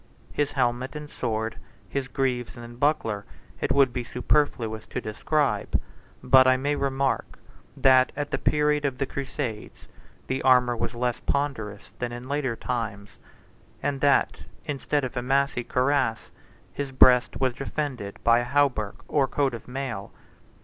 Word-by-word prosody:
His 145 -1 0
helmet 125 +1 0
and 150 0 -6
sword, 110 -4 -3 0.3
his 140 -1 -3
greaves 125 -3 -2
and 120 0 -10
buckler, 125 -8 +1 0.4
it - - -1
would 135 -3 +4
be 125 -1 -2
superfluous 120 -4 0
to - - -3
describe; 145 +7 0 0.4
but 130 0 +7
I 130 0 +5
may 145 +3 0
remark, 135 -1 -1 0.4
that, 130 -1 +5
at 145 0 -3
the - - -1
period 150 0 +2
of 135 -3 -1
the 135 - 0
crusades, 130 -5 -5 0.4
the 130 - -2
armor 125 -2 +4
was 115 +1 -3
less 120 0 -1
ponderous 110 -8 -2
than 120 -1 -2
in 120 +1 -7
later 135 -4 -1
times; 110 -5 -4 0.7
and 140 -1 -1
that, 140 -1 +3 0.2
instead 145 -1 -1
of 130 0 -4
a 120 - -1
massy 135 0 +1
cuirass, 130 -2 0 0.4
his 140 -1 -4
breast 125 -2 +5
was 130 -2 +1
defended 135 -6 -4
by 115 0 +5
a - - -1
hauberk 130 -7 +1
or 140 -3 +2
coat 140 -2 0
of 115 - -8
mail. 125 -6 -5
130 Hz, 150 wpm, -26 LUFS, 120-140 Hz, 0.7 s, but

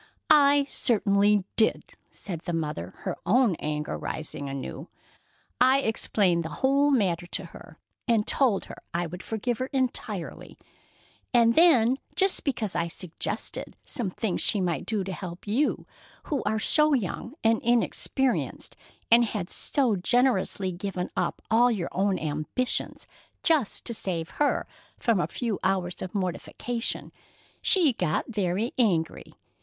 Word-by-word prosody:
"I 285 -1 +6
certainly 205 -6 +2
did," 220 - +1 0.2
said 175 -5 -7
the 175 - -3
mother, 150 - -3
her - - -3
own 220 +4 +3
anger 150 0 -3
rising 145 -2 -5
anew. 135 +3 -6 0.7
"I 260 +2 +5
explained 195 -7 +1
the 160 - -5
whole 275 +6 +2
matter 185 -10 +1
to - - -3
her, - - -13 0.3
and 225 -3 +2
told 245 -8 +2
her - - -11
I 175 0 0
would 175 +2 -7
forgive 225 +2 -3
her 255 - -1
entirely. 240 -9 -3 0.8
And 230 -1 +5
then 265 -6 +5 0.2
just 385 0 +3
because 225 -8 -2
I 170 - 0
suggested 170 0 -5
some 235 -7 -3
things 190 0 -2
she 210 - +3
might 175 -6 -2
do 215 -3 -1
to 190 0 -5
help 180 -2 -8
you 235 +9 0 0.4
who 285 -5 -2
are 220 +1 +1
so 300 +6 +5
young 235 - -4
and 225 0 +3
inexperienced, 245 +2 0 0.4
and 235 +1 +7
who 220 - -3
had 175 -3 -5
so 255 -7 +1
generously 200 -2 +1
given 180 0 -4
up - - -2
all 240 +2 +5
your 200 -8 -2
own 195 0 +1
ambitions 155 +12 -2 0.4
just 310 - +2
to 235 - -1
save 175 -6 -2
her 290 - +2 0.3
from 230 -5 +1
a - - 0
few 230 -5 -3
hours' 180 -2 0 0.2
mortification, 220 +5 -3 0.5
she 335 -9 +4
got 180 -7 -1
very 205 +1 -1
angry. 175 -9 0
210 Hz, 140 wpm, -27 LUFS, 180-250 Hz, 0.8 s, and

